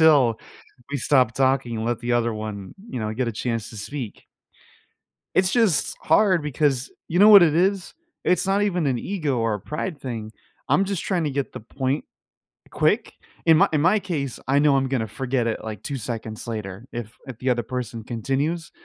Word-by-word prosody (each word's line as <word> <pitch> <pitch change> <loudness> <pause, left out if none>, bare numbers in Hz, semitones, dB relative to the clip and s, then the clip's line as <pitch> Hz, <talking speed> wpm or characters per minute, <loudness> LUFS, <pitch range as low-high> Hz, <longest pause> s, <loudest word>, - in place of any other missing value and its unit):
until 140 -8 +5 0.5
we 145 - -1
stop 130 -3 +3
talking 130 -3 +1
and 110 - -3
let 120 0 0
the 120 0 -1
other 120 -1 +2
one, 105 -3 -6
you 125 - -4
know, 110 0 -2
get 125 0 -1
a - - -3
chance 115 0 -3
to 110 - -10
speak. 125 0 -6 1.1
It's 185 0 +3
just 225 -10 +2
hard 185 0 +3
because, 145 -3 0 0.2
you 175 - 0
know 205 +3 +8
what 200 -4 +10
it 155 -3 +4
is? 190 +2 +1 0.3
It's 180 +1 +2
not 195 +1 +2
even 180 -6 +1
an 130 -3 +1
ego 155 -6 -2
or 115 -1 +1
a 105 - -4
pride 150 - -4
thing, 115 -4 -5 0.4
I'm 195 - +4
just 195 -3 -3
trying 180 -5 0
to 150 - 0
get 140 0 -3
the - - -7
point 130 +5 -2 0.7
quick. - - +1 0.3
In 160 -1 +7
my 195 +3 +5
in 150 - +2
my 175 +8 +4
case, 150 -9 -3
I 135 +1 +4
know 145 -1 +4
I'm 135 -1 +1
gonna 125 -4 -1
forget 125 +1 -1
it, 115 - -2
like, 110 -2 -6
2 140 - -3
seconds 110 -2 -5
later 105 -1 -5
if 115 -1 -6
if 130 -4 -8
the 130 - 0
other 120 -1 +1
person 120 -1 -5
continues. 140 +8 -2
135 Hz, 200 wpm, -24 LUFS, 115-160 Hz, 1.1 s, what